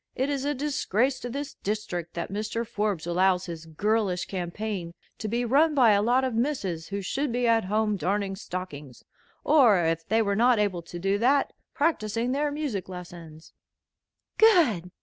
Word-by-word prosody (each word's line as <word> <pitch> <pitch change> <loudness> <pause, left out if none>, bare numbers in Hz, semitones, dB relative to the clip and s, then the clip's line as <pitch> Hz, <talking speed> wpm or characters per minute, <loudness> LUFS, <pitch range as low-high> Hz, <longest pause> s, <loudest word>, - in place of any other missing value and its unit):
It 265 +3 0
is 275 -1 -2
a 290 0 0
disgrace 265 -3 0
to 245 - -6
this 280 +4 -5
district 190 -5 -4
that 170 +1 -4
Mr. 215 +3 -2
Forbes 210 -7 -2
allows 180 +1 +2
his 165 -2 -8
girlish 195 +2 0
campaign 180 -1 -4 0.2
to 215 - -4
be 235 +3 -1
run 295 +6 +3
by 245 -5 +6
a 200 -1 +4
lot 245 +4 +2
of 260 -2 -1
misses 225 - -2
who 200 0 -4
should 275 +7 -2
be 245 0 0
at 225 -3 +3
home 210 +1 0
darning 195 +1 -1
stockings; 175 - -7 0.4
or, 225 - +5
if 165 0 -1
they 225 +1 +2
were 200 -1 0
not 240 +2 +4
able 200 -4 0
to 170 +1 -9
do 195 +3 0
that, 270 +4 +2 0.2
practicing 235 -6 0
their 290 +2 0
music 285 - -4
lessons." 170 -3 -10 0.9
"Good!" 310 - +4
210 Hz, 170 wpm, -26 LUFS, 180-250 Hz, 0.9 s, by